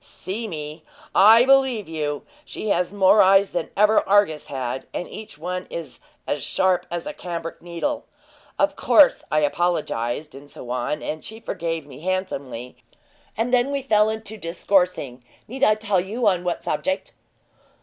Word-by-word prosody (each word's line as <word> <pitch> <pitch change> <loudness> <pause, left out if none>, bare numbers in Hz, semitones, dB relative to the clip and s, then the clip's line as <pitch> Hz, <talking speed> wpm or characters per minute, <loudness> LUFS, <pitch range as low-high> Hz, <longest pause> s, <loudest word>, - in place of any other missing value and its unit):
"See 220 +5 -6
me? 155 -3 -7 0.3
I 225 +5 +7
believe 265 -6 +3
you! 150 -3 -3 0.2
She 215 - -6
has 180 -2 +1
more 200 +1 +5
eyes 195 +1 +5
than 175 -2 -3
ever 210 +1 +5
Argus 195 -7 +3
had, 130 -1 -4
and 175 - -3
each 215 -7 -10
one 180 +3 -4
is 165 -3 -7 0.3
as - - -2
sharp 185 -1 +1
as 170 0 -4
a 300 - -5
cambric 170 - -6
needle. 175 - -3 0.5
Of - - +2
course - - +5
I 155 - +3
apologized, 150 -4 -1
and 140 +2 -12
so 125 - -9
on, 125 +4 -2
and 155 0 -4
she 220 +1 -8
forgave 165 -8 -4
me 140 -2 -12
handsomely, 140 -9 -4 0.6
and 235 +3 -1
then 250 +2 +3
we 280 -1 -2
fell 220 -3 +2
to 220 0 -8
discoursing 170 -7 0 0.2
need 265 +4 -5
I 215 -5 +5
tell 210 -4 0
you 220 +6 -3
on 185 -4 +3
what 175 -1 -2
subject?" 280 - -2
180 Hz, 160 wpm, -23 LUFS, 155-215 Hz, 0.6 s, I